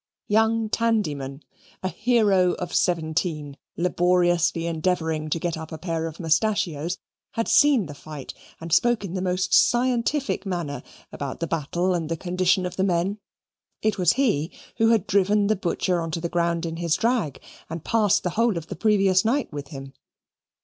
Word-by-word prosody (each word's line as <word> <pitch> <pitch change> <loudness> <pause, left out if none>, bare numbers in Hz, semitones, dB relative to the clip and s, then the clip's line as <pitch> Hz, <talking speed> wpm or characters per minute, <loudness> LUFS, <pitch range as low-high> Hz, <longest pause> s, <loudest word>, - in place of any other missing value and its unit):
Young 225 +1 +2
Tandyman, 155 - -1 0.4
a - - +1
hero 205 -4 +2
of 180 - -5
seventeen, 160 -3 0 0.2
laboriously 175 -1 +2
endeavouring 160 -2 -1
to 160 - 0
get 170 0 -2
up 160 0 -8
a 160 - -5
pair 165 -1 -3
of 160 0 -9
mustachios, 170 -1 0 0.4
had 230 - -1
seen 280 -8 +5
the 145 - -8
fight, 145 -1 -9 0.3
and 165 0 -5
spoke 240 +4 +3
in 180 - -6
the 185 - -2
most 185 0 -1
scientific 250 0 +2
manner 175 -7 -3 0.3
about 140 -2 -5
the 170 - -1
battle 165 +4 -1
and 165 -3 -2
the 165 - -2
condition 180 +2 +1
of 180 0 -5
the 190 - +1
men. 190 +2 0 0.6
It 215 -2 +1
was 180 - +4
he 210 - +1 0.3
who 225 0 +4
had 225 -4 +3
driven 205 +1 +2
the 215 +2 +2
Butcher 180 -1 -1
on 165 - -3
to 160 - -3
the 170 +1 -3
ground 170 0 0
in 165 0 -4
his 170 -2 +1
drag 230 - 0 0.3
and 165 0 -6
passed 215 -4 +2
the 180 - -1
whole 230 -1 +1
of 165 -1 -7
the - - -5
previous 195 -4 +3
night 245 - 0
with 145 -1 -6
him. 135 -2 -9
180 Hz, 175 wpm, -24 LUFS, 165-210 Hz, 0.6 s, seen